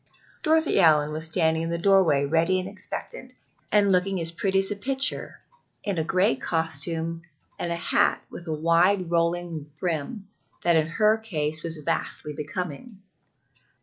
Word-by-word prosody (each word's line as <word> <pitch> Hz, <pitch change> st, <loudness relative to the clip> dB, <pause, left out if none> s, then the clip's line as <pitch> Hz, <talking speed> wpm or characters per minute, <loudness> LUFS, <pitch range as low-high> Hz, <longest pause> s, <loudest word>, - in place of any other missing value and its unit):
Dorothy 320 Hz, 0 st, +2 dB
Allyn 150 Hz, -2 st, +4 dB
was 155 Hz, +1 st, -4 dB
standing 160 Hz, -1 st, +1 dB
in 165 Hz, -, -2 dB
the 170 Hz, -, -1 dB
doorway 170 Hz, -6 st, +4 dB
ready 165 Hz, +5 st, +2 dB
and 185 Hz, -, -5 dB
expectant, 205 Hz, -, -7 dB, 0.4 s
and 205 Hz, -1 st, +4 dB
looking 190 Hz, +1 st, +1 dB
as 165 Hz, 0 st, +2 dB
pretty 190 Hz, +3 st, -1 dB
as 195 Hz, +1 st, 0 dB
a -, -, -1 dB
picture 265 Hz, +6 st, -1 dB, 0.4 s
in 200 Hz, -5 st, -2 dB
a -, -, +1 dB
gray 185 Hz, -1 st, +2 dB
costume 165 Hz, +2 st, -2 dB, 0.4 s
and 170 Hz, -, -2 dB
a -, -, 0 dB
hat 170 Hz, -, +1 dB
with 175 Hz, -, -10 dB
a -, -, -2 dB
wide 170 Hz, +4 st, +2 dB
rolling 170 Hz, -2 st, -1 dB
brim, 180 Hz, +5 st, -3 dB, 0.4 s
that 170 Hz, -1 st, +3 dB
in 155 Hz, -1 st, +2 dB
her 215 Hz, +6 st, +2 dB
case 155 Hz, -8 st, -2 dB
was 165 Hz, 0 st, -4 dB
vastly 150 Hz, -1 st, -2 dB
becoming. 180 Hz, -, -6 dB
170 Hz, 155 wpm, -25 LUFS, 160-195 Hz, 0.4 s, Allyn